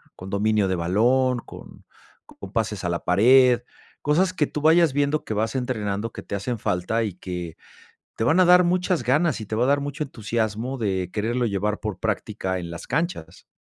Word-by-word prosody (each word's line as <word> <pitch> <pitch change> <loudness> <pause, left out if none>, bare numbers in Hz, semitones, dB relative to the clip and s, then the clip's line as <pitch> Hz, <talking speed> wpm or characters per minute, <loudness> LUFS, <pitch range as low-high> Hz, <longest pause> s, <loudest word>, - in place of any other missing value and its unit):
con 90 - -9
dominio 105 0 +1
de 95 - 0
balón, 120 +9 +2
con - - -13 0.4
con 95 - -12
pases 110 -4 -2
a 85 - -1
la 85 0 -3
pared, 120 +6 +5 0.4
cosas 175 +6 +2
que 150 -5 0
tú 150 - -5
vayas 160 -1 +4
viendo 145 +2 0
que - - -3
vas 110 +4 -1
entrenando, 110 -4 -2
que - - -8
te - - -5
hacen 110 +4 -3
falta, 100 +5 -1
y 105 -4 -3
que, 90 -2 -7 0.6
te - - -2
van 160 +10 +3
a 185 - +6
dar 180 +1 +7
muchas 180 -3 0
ganas 140 +2 +1
y - - -6
te 110 - -4
va 120 +3 +2
a - - +1
dar 140 +1 +2
mucho 145 +2 -3
entusiasmo 115 0 -3
de 95 -6 -2
quererlo 120 +3 -1
llevar 105 +1 -1
por 105 -4 -5
práctica 95 0 -2
en 85 -1 -7
las 85 - -8
canchas. 95 - -3
115 Hz, 200 wpm, -24 LUFS, 100-140 Hz, 0.6 s, dar